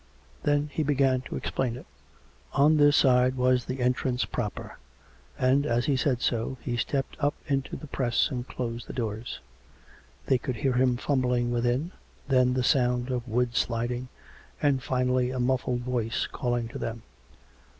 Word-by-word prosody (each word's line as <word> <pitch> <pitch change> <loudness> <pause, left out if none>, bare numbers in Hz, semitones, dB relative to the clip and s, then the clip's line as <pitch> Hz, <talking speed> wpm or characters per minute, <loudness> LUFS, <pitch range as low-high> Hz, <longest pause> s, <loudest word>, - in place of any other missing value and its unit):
Then 145 0 +1
he - - 0
began 135 -3 +2
to - - -7
explain 125 -3 -2
it. 125 - -10 0.7
On 150 +3 +5
this 145 -1 +5
side 130 -1 +4
was 125 -1 +2
the 130 0 -4
entrance 125 0 +1
proper, 105 -4 -5 0.6
and, 130 +2 +3
as 120 -1 +1
he 140 - +2
said 130 -2 +1
so, 120 +2 -1
he 120 - -3
stepped 135 +3 -2
up 145 0 +1
into 135 -3 -1
the - - -8
press 130 -1 0
and 125 -1 -4
closed 120 -1 -5
the - - -7
doors. 110 -1 -4 0.8
They 130 - +3
could 130 - -3
hear 130 +3 0
him 125 0 +2
fumbling 125 -3 +1
within, 120 +7 0 0.4
then 125 -2 +3
the 130 - +1
sound 125 -1 +2
of 125 -1 -2
wood 120 +1 0
sliding, 120 +2 -1 0.5
and 140 -3 +2
finally 125 0 +1
a 130 0 -3
muffled 125 0 0
voice 120 -2 -1
calling 120 -2 -2
to - - -7
them. 115 0 -4
125 Hz, 160 wpm, -27 LUFS, 120-135 Hz, 0.8 s, On